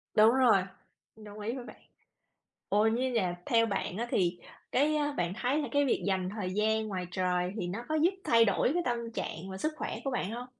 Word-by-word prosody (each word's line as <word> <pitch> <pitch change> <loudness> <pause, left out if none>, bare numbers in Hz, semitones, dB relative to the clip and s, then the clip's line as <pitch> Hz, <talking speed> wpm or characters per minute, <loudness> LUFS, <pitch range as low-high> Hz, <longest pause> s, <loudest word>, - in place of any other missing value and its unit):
Đúng 215 +1 +7
rồi. 240 -8 +5 0.5
Đồng 210 -1 -11
ý 220 +4 -3
với 250 -2 -7
bạn. - - -13 0.9
Ủa, 210 +2 +3
như 250 +3 +1
nhà 185 -7 0
theo 230 -1 +4
bạn 195 -4 -2
á, 235 +3 -2
thì 175 -1 +1 0.3
cái, 300 +4 +3
a, 295 -1 0
bạn 175 -10 -1
thấy 255 +5 0
là - - -3
cái 285 0 +3
việc 265 - +1
dành 190 -2 0
thời 195 -2 -4
gian 220 +1 +1
ngoài 185 -3 -3
trời 180 0 0
thì 180 - -2
nó 200 +7 -4
có 310 - -1
giúp 315 +3 +4
thay 230 0 +5
đổi 205 +3 +2
cái 350 - +1
tâm 235 -1 -2
trạng 190 -3 -5
và 190 - -6
sức 310 +10 -1
khỏe - - -4
của 275 - 0
bạn 245 -6 -2
hông? 240 +2 -5
220 Hz, 225 wpm, -30 LUFS, 190-250 Hz, 0.9 s, Đúng